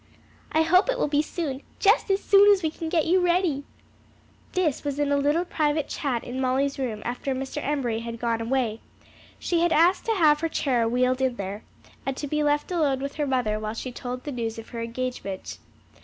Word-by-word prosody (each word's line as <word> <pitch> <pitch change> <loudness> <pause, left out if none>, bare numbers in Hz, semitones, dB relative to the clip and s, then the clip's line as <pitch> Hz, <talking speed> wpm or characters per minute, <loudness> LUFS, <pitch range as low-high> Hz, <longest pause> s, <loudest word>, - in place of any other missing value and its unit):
"I 315 - +3
hope 365 +7 +4
it - - +1
will - - +1
be 290 0 +2
soon, 300 -4 -4 0.2
just 415 +1 +3
as 390 +1 +1
soon 405 0 +7
as 390 -3 +3
we 315 - +1
can 325 0 -5
get 325 -2 +2
you 360 +3 +4
ready." 345 -5 +1 0.9
This 345 -7 0
was 285 -1 -3
a 290 - +2
little 285 +4 +1
private 300 -3 0
chat 255 -6 -2
in 255 +2 -4
Molly's 270 +2 0
room 225 -5 -3
after 250 +3 -2
Mr. 270 +3 -4
Embury 260 -6 -1
had 230 0 -6
gone 230 -1 -1
away. 230 -2 -1 0.6
She 345 - 0
had 340 0 +2
asked 345 +4 +4
to 455 - +2
have 305 -5 +4
her 330 +1 -1
chair 245 -7 +1
wheeled 255 +2 +1
in 260 -2 +1
there, 200 0 -5 0.4
and 270 -1 -3
to - - -3
be 300 +1 -1
left 295 +3 +1
alone 295 -7 +1
with 280 +1 -5
her 295 -2 0
mother 245 -5 0
while 215 +1 -4
she 255 +2 -5
told 250 +1 -6
her 290 - -6
the - - -6
news 230 -2 -3
of 225 - -9
her 235 - -5
engagement. 230 -5 -5
280 Hz, 215 wpm, -25 LUFS, 245-320 Hz, 0.9 s, soon